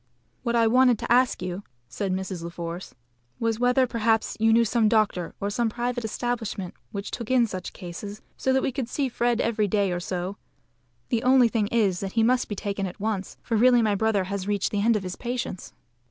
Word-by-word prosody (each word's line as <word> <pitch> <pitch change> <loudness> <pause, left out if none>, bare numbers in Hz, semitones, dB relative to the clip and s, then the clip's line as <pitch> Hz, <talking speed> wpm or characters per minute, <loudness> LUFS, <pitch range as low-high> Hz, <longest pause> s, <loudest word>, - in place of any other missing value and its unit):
"What 235 0 -1
I 230 -1 +4
wanted 250 +1 +5
to - - -5
ask 245 -5 +3
you," 185 +1 -4 0.3
said 195 - -3
Mrs. 185 -1 -3
La 170 - -5
Force, 170 +1 -7 0.4
"was 225 -1 0
whether 250 +1 +4
perhaps 225 -2 +1
you 225 +1 +4
knew 230 +1 +5
some 220 -1 +2
doctor 210 -6 +1
or 200 +1 -2
some 235 +2 +1
private 245 +1 -2
establishment 220 -4 -3 0.2
which 200 0 -5
took 235 -3 -5
in 255 -2 +4
such 185 -4 -5
cases 200 +3 -8 0.2
so 265 - 0
that 265 0 +2
we - - 0
could 255 -2 -4
see 275 -1 -1
Fred 240 -1 0
every 220 -3 +1
day 200 -1 +1
or 175 - -1
so. 180 +2 -4 0.7
The 230 - +1
only 255 -1 +5
thing 220 -3 0
is 205 -6 +1
that 195 -1 -4
he 225 - +3
must 250 +2 +2
be 205 - -3
taken 200 0 -3
at 180 - -9
once, 205 -2 -3
for 230 - -1
really 245 +1 +5
my 215 -2 +2
brother 205 -1 +1
has 195 0 -4
reached 205 -1 0
the 205 - 0
end 230 +2 +3
of 210 - -1
his 185 0 -5
patience." 240 -6 -4
220 Hz, 215 wpm, -26 LUFS, 195-240 Hz, 0.7 s, wanted